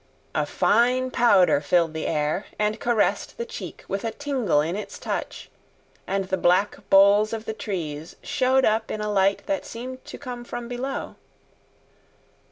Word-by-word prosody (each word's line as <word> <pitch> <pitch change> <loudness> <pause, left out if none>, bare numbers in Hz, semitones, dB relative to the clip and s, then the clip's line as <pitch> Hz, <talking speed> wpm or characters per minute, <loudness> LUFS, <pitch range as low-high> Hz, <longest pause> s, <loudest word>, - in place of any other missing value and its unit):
A - - 0
fine 255 +2 +2
powder 200 - +4
filled 165 +2 +2
the 160 - -3
air 150 +6 -1
and 210 +1 0
caressed 235 - 0
the 470 - -3
cheek 470 - -8
with 195 - -3
a 230 - 0
tingle 260 - 0
in 160 +4 0
its 210 - -6
touch, - - -5 0.6
and 195 0 -1
the 190 0 -1
black 185 +4 +2
boles 200 +3 +6
of 220 0 -4
the 220 - -3
trees 165 -8 -5
showed 260 0 +2
up 220 +1 +1
in 215 - -3
a 210 0 -2
light 195 0 +2
that 295 -1 -1
seemed 255 +2 -8
to - - -8
come 250 -3 -7
from 240 0 -6
below. 250 +3 -4
215 Hz, 165 wpm, -24 LUFS, 190-245 Hz, 0.6 s, boles